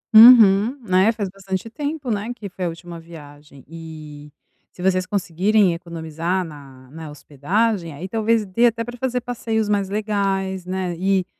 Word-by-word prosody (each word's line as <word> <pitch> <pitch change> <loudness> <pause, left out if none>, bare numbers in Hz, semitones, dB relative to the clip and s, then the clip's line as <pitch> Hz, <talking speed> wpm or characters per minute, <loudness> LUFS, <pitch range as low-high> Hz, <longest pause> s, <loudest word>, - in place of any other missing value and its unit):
Uhum, 220 0 +8
né, 185 +4 +4
faz 215 -3 -4
bastante 195 +2 -6
tempo, 290 -2 -4
né, 210 +3 -2
que 210 -4 -8
foi 185 -1 -5
a - - 0
última 170 0 -9
viagem, 145 -4 -14
e 155 -2 -10 0.4
se 180 - -10
vocês 185 -1 +1
conseguirem 195 0 +1
economizar 170 +1 -3
na 135 -4 -13
na 160 0 -9
hospedagem, 170 - -2
aí 160 +6 -7
talvez 225 +1 +1
dê 230 +6 +3
até 230 0 -1
pra 245 +1 -8
fazer 250 0 -2
passeios 225 -3 -2
mais 200 -2 0
legais, 195 -3 -2
né, 185 -1 -3
e 190 -1 +1
190 Hz, 160 wpm, -21 LUFS, 165-215 Hz, 0.4 s, Uhum